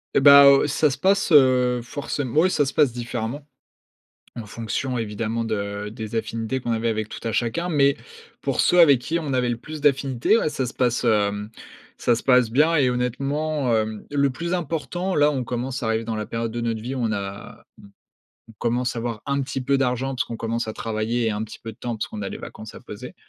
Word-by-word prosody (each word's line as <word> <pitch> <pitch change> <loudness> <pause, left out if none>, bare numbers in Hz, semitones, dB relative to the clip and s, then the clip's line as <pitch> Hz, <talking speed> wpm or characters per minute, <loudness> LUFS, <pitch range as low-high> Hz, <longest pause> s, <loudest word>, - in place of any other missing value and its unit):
Et - - +6
bah, 140 +1 +9
heu, 140 +1 +6
ça 150 +1 +2
se 135 - -4
passe 195 0 +2
heu, 125 -4 +5
forcém 140 +3 -4
ouais, 175 +4 +5
ça 145 - +2
se 135 - -4
passe 145 -5 +3
différemment 120 +4 -5 0.9
en 115 - -6
fonction 115 +4 -3
évidemment 115 +1 -2
de 100 -2 -3
des 110 0 -7
affinités 115 +3 -2
qu'on 120 - -2
avait 115 0 0
avec 110 -1 -2
tout - - -8
à - - -1
chacun. 125 +11 -1
Mais 140 -4 +3 0.4
pour - - 0
ceux 180 - +4
avec 145 -7 +7
qui 160 +6 -1
on 150 -4 -3
avait 125 -1 +1
le 120 - -1
plus 155 +5 -9
d'affinités 135 - +2
ah, 155 - 0
ça 130 - -2
se - - -7
passe, 125 -1 +1
hem, 105 -2 +1 0.5
ça 120 - +2
se 115 - -5
passe 125 -3 +3
bien 155 +7 +3
et 135 -5 +3
honnêtement, 135 +2 -1
hem, 110 -1 -2
le 140 -1 +2
plus 170 +6 -4
important 175 +2 -2
là, 150 0 +4
on 135 -3 -2
commence 125 +2 -4
à 115 - -2
arriver 110 0 0
dans 115 0 -3
la 105 -1 -4
période 115 0 -3
de 120 +1 -4
notre 115 -1 -2
vie, 125 +4 -4
où 130 - -4
on 115 -2 0
a 100 -1 -5
on - - -31 0.9
on - - -20
commence 120 +1 -1
à 115 - -2
avoir 115 -2 -4
un 140 0 0
petit 135 0 -4
peu 140 +2 +1
d'argent 135 0 -1
parce 125 - 0
qu'on 115 - -7
commence 115 0 -2
à 110 - -4
travailler 115 +2 -2
et - - +2
un 105 +1 -3
petit 110 - -10
peu 115 - -7
de 110 - -18
temps 120 -1 -4
parce 110 - -4
qu'on 105 -2 -6
a 95 - -3
les - - -6
vacances 110 0 -9
à - - -10
poser, - - -9
125 Hz, 235 wpm, -23 LUFS, 115-140 Hz, 0.9 s, bah